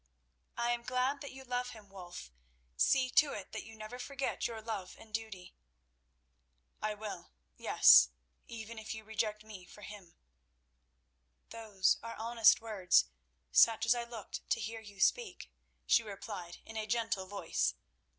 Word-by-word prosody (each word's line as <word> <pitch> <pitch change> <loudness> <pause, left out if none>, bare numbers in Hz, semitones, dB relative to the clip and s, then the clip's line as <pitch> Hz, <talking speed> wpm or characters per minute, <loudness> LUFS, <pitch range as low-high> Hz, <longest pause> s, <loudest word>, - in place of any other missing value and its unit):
"I 235 0 +1
am 240 0 -1
glad 255 +3 0
that 280 - -7
you 265 0 -10
love 250 -1 -2
him, 215 -3 -13
Wulf. 175 - -10 0.4
See 255 - +3
to 295 +2 +4
it 200 - -7
that - - -4
you 225 - -12
never 215 +3 -8
forget 275 +1 -2
your 230 -1 -6
love 215 -4 -5
and 220 -1 -16
duty." 220 -5 -5 1.3
"I 215 0 -1
will; 210 -1 -7 0.3
yes—even 65 - +4
if 220 0 -6
you 220 - -9
reject 215 -1 -2
me 210 -4 -10
for 210 - -14
him." 200 -5 -11 1.4
"Those 215 -4 +1
are 230 0 -7
honest 230 0 +4
words, 200 - +3 0.5
such 225 - +5
as 225 - +5
I 240 -1 -2
looked 235 -3 -8
to - - +2
hear 225 +1 -5
you 205 -2 -13
speak," 435 - +1 0.3
she - - +5
replied 200 -5 -7
in 225 - -8
a 215 -1 -3
gentle 225 -4 -1
voice. 200 +1 -1
220 Hz, 150 wpm, -33 LUFS, 200-235 Hz, 1.4 s, such